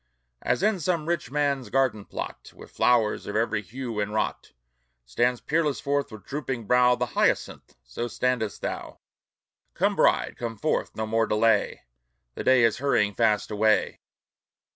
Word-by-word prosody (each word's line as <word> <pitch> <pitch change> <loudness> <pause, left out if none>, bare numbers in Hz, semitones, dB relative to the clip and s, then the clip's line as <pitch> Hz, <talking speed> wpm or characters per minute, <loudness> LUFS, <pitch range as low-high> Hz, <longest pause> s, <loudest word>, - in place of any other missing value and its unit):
As - - 0
in 210 -2 +2
some 165 -1 -1
rich 170 -8 -1
man's 140 -4 -1
garden 120 -5 +1
plot, - - -7
With - - -13
flowers 110 -1 +2
of 105 - -5
every 110 -1 0
hue 115 +1 -6
inwrought, 105 +1 -2 0.5
Stands 120 - 0
peerless 150 -2 0
forth 140 -2 -1
with 110 -3 -11
drooping 130 -5 -4
brow 125 +2 +4
The 125 0 -1
hyacinth, - - 0
so - - -5
standest 125 -3 -2
thou! - - -5 0.8
Come, - - +1
bride, - - +2
come 115 -2 -4
forth! 155 - -1
no 110 - -2
more 115 +1 +1
delay! 105 0 +1 0.5
The - - -6
day 130 -2 +5
is 115 -1 +2
hurrying 110 -7 +1
fast 105 -1 +1
away! 105 +1 +1
120 Hz, 150 wpm, -26 LUFS, 110-135 Hz, 0.8 s, day